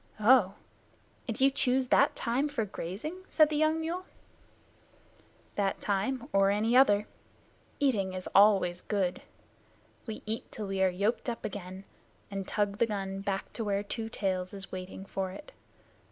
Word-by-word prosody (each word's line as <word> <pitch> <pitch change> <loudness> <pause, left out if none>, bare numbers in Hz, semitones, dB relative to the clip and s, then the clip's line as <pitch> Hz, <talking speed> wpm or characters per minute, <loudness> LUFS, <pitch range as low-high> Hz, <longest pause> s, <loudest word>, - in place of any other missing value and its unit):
"Oh! 215 -3 +5 0.7
And 225 - -3
you 270 +1 +5
choose 255 -1 +1
that - - +4
time 255 +5 0
for 270 -7 -1
grazing?" 215 - -6
said 310 -2 +5
the 305 - -2
young 310 +1 +2
mule. 340 +3 -3 1.5
"That 195 -1 0
time 225 +6 -1
or 195 0 +4
any 215 +4 +2
other. 210 -6 +5 0.7
Eating 210 -10 +1
is 185 - -5
always 195 -4 +5
good. 195 -4 -1 0.9
We 220 - -6
eat 220 +1 -4
till 215 - -5
we 195 -1 -2
are 190 - +5
yoked 200 +7 -1
up 235 - -5
again 190 -2 -6 0.5
and 195 -1 -4
tug 205 -1 -1
the 235 - +4
gun 195 -2 -3
back 195 -1 -3
to 230 - -3
where 200 -1 0
Two 225 +2 -4
Tails 185 -3 -2
is 195 -1 -7
waiting 185 +1 -7
for 195 -1 -3
it. 195 - -10
205 Hz, 155 wpm, -30 LUFS, 195-250 Hz, 1.5 s, Oh